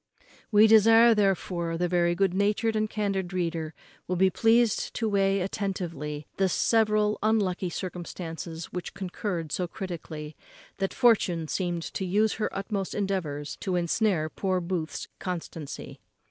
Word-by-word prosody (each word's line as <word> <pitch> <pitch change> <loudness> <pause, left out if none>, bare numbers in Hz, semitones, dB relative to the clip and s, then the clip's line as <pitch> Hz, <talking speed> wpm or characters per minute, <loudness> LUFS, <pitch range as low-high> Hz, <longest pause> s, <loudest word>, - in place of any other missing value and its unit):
We 210 0 +7
desire, 225 +2 +7
therefore, 180 -5 0
the 175 0 +1
good 195 -2 +2
natured 210 +3 +1
and 215 0 0
candid 195 -4 -2
reader 165 -3 -2 0.3
will 180 - -1
be 190 +1 +4
pleased 225 0 +2
to 225 - 0
weigh 195 -1 +2
attentively 175 -6 -3
the 190 -1 +2
several 215 +1 +2
unlucky 200 -4 +1
circumstances 170 -2 -6
which 180 - -5
concurred 180 -4 -4
so 180 - -1
critically, 160 -4 -7 0.4
that 195 0 0
Fortune 190 -10 +3
seemed 175 -1 -2
to - - -2
have 180 - -4
used 215 +1 +3
her 215 - 0
utmost 195 -1 -3
endeavours 170 -8 -2
to 185 - -2
ensnare 175 -1 +1
poor 185 +3 -1
Booth's 170 -2 -3
constancy. 165 -4 -6
190 Hz, 135 wpm, -27 LUFS, 170-210 Hz, 0.4 s, We